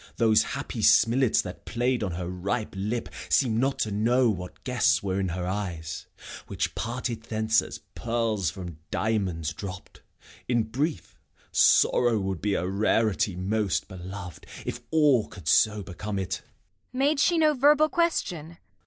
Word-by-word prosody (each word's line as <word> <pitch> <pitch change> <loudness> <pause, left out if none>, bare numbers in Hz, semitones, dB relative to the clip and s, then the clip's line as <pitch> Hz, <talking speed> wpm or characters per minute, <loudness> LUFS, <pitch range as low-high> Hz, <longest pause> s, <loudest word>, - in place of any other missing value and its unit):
Those 110 -2 +4 0.2
happy - - -5
smilets 120 +1 +4
That 90 - -8
play'd 120 +1 0
on 95 -4 -2
her 85 0 -4
ripe 100 +6 -3
lip 105 +5 -2 0.2
seem'd 115 -5 +2
not 135 +2 +1
to 110 - -1
know 115 +4 +3
What 90 -3 -7
guests 125 -5 +2
were 95 -1 -1
in 95 - 0
her 90 +1 -3
eyes, 90 -4 -4 0.4
which - - -2
parted 120 0 -3
thence 110 0 +1
As - - -8
pearls 115 -6 -1
from 85 -1 -8
diamonds 90 -8 -1
dropp'd. 95 -1 -9 0.5
In 120 -2 +2
brief, 140 +9 -3 0.3
Sorrow 120 -2 +4
would 95 -3 -3
be 105 -1 0
a 90 - -1
rarity 100 0 +1
most 95 -3 -1
belov'd, 90 -3 -8 0.2
If - - -4
all 145 -8 +3
could 85 -5 -12
so 105 +4 +3
become 100 +3 -5
it. 95 0 -2
Kent. - - -30 0.5
Made 275 +3 +2
she 340 +3 +3
no 310 -1 +4
verbal 295 +3 +5
question? 310 - 0
Gent. 165 +1 -15
110 Hz, 155 wpm, -27 LUFS, 95-125 Hz, 0.5 s, verbal